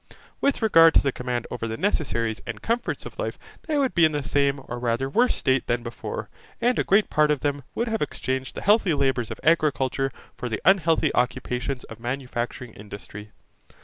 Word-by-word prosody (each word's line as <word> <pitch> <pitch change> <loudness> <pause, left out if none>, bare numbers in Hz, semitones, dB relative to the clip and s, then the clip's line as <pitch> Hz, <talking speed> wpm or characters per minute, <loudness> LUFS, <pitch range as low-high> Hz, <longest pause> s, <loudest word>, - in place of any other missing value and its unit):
With 280 -4 +1
regard 165 -6 +6
to - - +7
the 140 - +1
command 125 -2 -3
over 115 - -3
the 110 0 -4
necessaries 115 - -1
and 110 -3 -5
comforts 235 +1 -2
of - - -10
life, - - -3 0.3
they 305 -2 0
would 275 -3 +1
be 170 - +3
in 155 -1 +5
the 145 -1 -1
same 140 0 +1
or 120 - -5
rather 120 +2 0
worse 240 - +2
state 130 -1 +1
than 120 0 0
before; 115 0 -6 0.3
and 245 +1 +2
a - - +3
great 200 +2 +3
part 150 0 +3
of 150 -3 +1
them 145 -1 -1
would 235 - -1
have 220 -1 -1
exchanged 130 -3 -3
the - - -5
healthy 205 -5 +4
labours 130 -5 0
of - - -6
agriculture 140 -4 +2 0.2
for 125 - -5
the 110 - -2
unhealthy 165 -4 +4
occupations 125 +1 -1
of 115 - -11
manufacturing 125 -1 -4
industry. 105 0 -10
135 Hz, 195 wpm, -25 LUFS, 120-165 Hz, 0.3 s, to